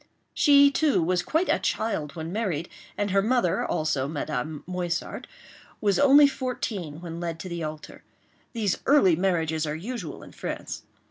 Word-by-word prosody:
She, 285 -1 +6
too, 280 - +2
was 180 +2 +1
quite 320 - 0
a - - +2
child 190 -10 -2
when 160 0 -5
married; 180 -7 -2 0.3
and 205 -1 -1
her 195 +1 +4
mother, 220 -5 +1
also, 155 -4 -1
Madame 150 0 -4
Moissart, 180 -1 -3 0.5
was 200 -3 +1
only 285 +1 +7
fourteen 215 - -4
when 170 -1 -6
led 170 -1 -4
to 185 - -7
the 170 -1 -4
altar. 155 0 -7 0.5
These 210 -6 0
early 230 - +5
marriages 160 -3 0
are 150 - -2
usual 185 - -6
in - - -12
France. - - -6
180 Hz, 155 wpm, -26 LUFS, 160-230 Hz, 0.5 s, only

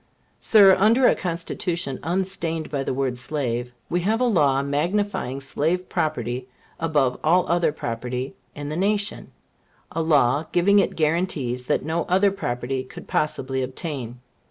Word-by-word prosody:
Sir, 200 -4 +7
under 230 +6 +5
a - - +5
Constitution 170 -4 -3
unstained 170 -2 -2
by 140 -2 -1
the - - -2
word 130 -1 -1
slave, 125 -3 -2 0.2
we 175 - 0
have 215 +5 +1
a - - +2
law 145 - +3
magnifying 150 -1 -1
slave 160 +6 -1
property 130 -5 -2 0.3
above 145 -6 +1
all 175 +4 +4
other 175 -2 +2
property 125 -1 -4 0.2
in 145 0 -5
the 155 - -3
nation 200 +3 -1 0.6
a 165 - -1
law 145 -1 +3
giving 200 +4 +4
it - - +1
guarantees 150 -7 -1
that - - 0
no 165 +2 -1
other 190 +2 +3
property 130 -6 -3
could - - -12
possibly 135 -3 -1
obtain. 130 -2 -5
155 Hz, 145 wpm, -23 LUFS, 130-180 Hz, 0.6 s, Sir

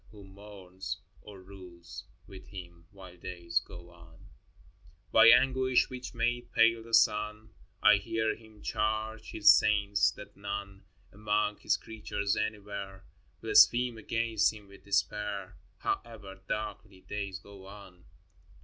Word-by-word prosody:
Who 105 -1 -14
mourns 95 -2 -9 0.2
Or 100 -2 -12
rules 90 -2 -12 0.2
with 95 -1 -13
Him, 85 -3 -11
while 95 -3 -13
days 85 -1 -2
go 85 0 -13
on? 85 -1 -17
XIX. - - -20 0.9
By - - +7
anguish 130 -1 +4
which 130 -1 -7
made 120 +1 -1
pale 115 0 +4
the 115 +1 -13
sun, 105 -1 +1 0.3
I 105 - +7
hear 110 +1 -1
Him 110 -2 -18
charge 110 0 -2
His 105 -1 +6
saints 100 -1 +3
that 105 - -12
none 100 -1 -6 0.3
Among 105 0 0
His - - +1
creatures 105 -2 -3
anywhere 100 -2 -5 0.4
Blaspheme 120 -1 +5
against 115 -1 +1
Him 105 -2 -13
with 100 - -17
despair, 100 -1 -2 0.2
However 100 -5 -5
darkly 105 -2 -5
days 100 -2 -5
go 95 -1 -14
on. 95 -3 -14
100 Hz, 130 wpm, -30 LUFS, 95-110 Hz, 0.9 s, By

